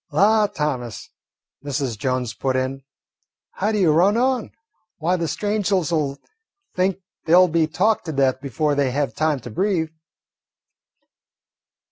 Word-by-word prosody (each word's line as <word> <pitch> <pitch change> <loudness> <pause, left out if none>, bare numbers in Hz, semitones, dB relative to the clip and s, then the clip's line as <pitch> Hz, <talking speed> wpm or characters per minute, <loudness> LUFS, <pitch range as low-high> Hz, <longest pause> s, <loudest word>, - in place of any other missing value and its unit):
"La, 210 +7 +4
Thomas," 130 - -4 0.5
Mrs. 140 -4 -2
Jones 125 0 -2
put 130 +3 -2
in, 130 +1 -2 0.7
"how 200 - -2
you 215 -2 +1
do 160 - +5
run 185 +8 +4
on! 255 -2 +1 0.5
Why, 170 +3 +1
the 170 -2 -2
strangers 205 -4 0
'll 150 -4 0 0.6
think 185 +1 +1 0.3
they 165 - +4
'll 185 0 +7
be 165 -1 +1
talked 195 +6 +1
to 160 - -3
death 135 -2 +1
before 145 +3 -1
they 140 -2 +1
have 140 +2 -1
time 155 -3 0
to 120 - -9
breathe." 180 - 0
155 Hz, 140 wpm, -22 LUFS, 135-190 Hz, 0.7 s, ll